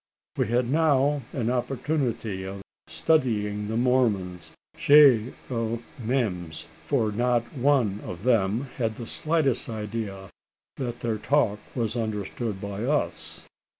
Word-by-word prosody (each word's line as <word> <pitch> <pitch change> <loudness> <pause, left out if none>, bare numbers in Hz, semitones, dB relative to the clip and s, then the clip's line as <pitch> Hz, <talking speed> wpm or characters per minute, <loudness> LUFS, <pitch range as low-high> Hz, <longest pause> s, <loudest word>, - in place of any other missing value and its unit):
We - - 0
had 120 +2 +1
now 145 -1 +3
an 120 -3 -1
opportunity 125 -5 -1
of 95 +1 -7 0.2
studying 105 -9 +1
the 110 +1 -2
Mormons 110 -8 +1 0.2
chez 135 -6 +6 0.2
eux 115 -1 -1 0.2
memes: 90 -10 -2 0.2
for 115 -7 +1
not 120 +2 +1
one 130 -7 +2
of 90 +2 -7
them 110 -2 +2 0.2
had 115 -4 -1
the 115 - -7
slightest 150 -2 0
idea 105 -3 -5 0.5
that 120 -3 -4
their 110 -2 -1
talk 115 -6 +2 0.2
was 115 -2 -1
understood 110 -1 -3
by 100 +1 -5
us. 145 +4 -2
115 Hz, 120 wpm, -26 LUFS, 105-130 Hz, 0.5 s, chez